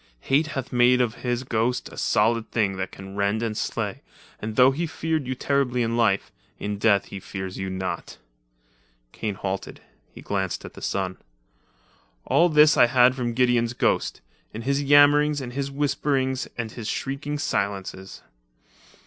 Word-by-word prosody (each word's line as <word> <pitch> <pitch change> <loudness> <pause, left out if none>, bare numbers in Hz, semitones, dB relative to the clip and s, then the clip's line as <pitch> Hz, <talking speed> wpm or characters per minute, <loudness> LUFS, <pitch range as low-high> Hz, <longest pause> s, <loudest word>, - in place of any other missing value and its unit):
Hate 145 +4 +2
hath 135 -4 -5
made 125 +1 +5
of 120 -3 +1
his 125 0 -1
ghost, 120 +1 -1
a - - -12
solid 115 +2 +1
thing 100 -4 0
that 95 -1 -4
can 95 0 -10
rend 100 +3 0
and 110 -2 -2
slay, - - -3 0.4
and 110 0 -4
though 130 +2 +6
he 165 +5 -2
feared 160 -3 -2
you 130 - -2
terribly 125 -2 0
in 115 0 -1
life, 110 -5 +1 0.3
in 105 0 -4
death 100 -2 +3
he 100 - -6
fears 95 0 -6
you 95 0 -3
not 95 -2 -3
at - - -18
all." - - -40
Kane 105 -3 -4
halted. 95 -1 -5 0.3
He - - -12
glanced 95 -3 -3
at - - -10
the - - -12
sun. 95 -1 -2 1.1
"All 175 +1 +4
this 150 -1 +6
I - - +7
had 125 +1 +5
from 120 -3 -3
Gideon's 120 -2 +2
ghost, - - 0 0.3
in 115 - -5
his 140 +2 0
yammerings 145 +1 +5
and 125 -2 -6
his 140 +1 -2
whisperings 135 -2 -1
and 115 -2 -3
his 110 -2 -7
shrieking 140 +4 -3
silences. 100 -7 -3
120 Hz, 170 wpm, -24 LUFS, 100-135 Hz, 1.1 s, I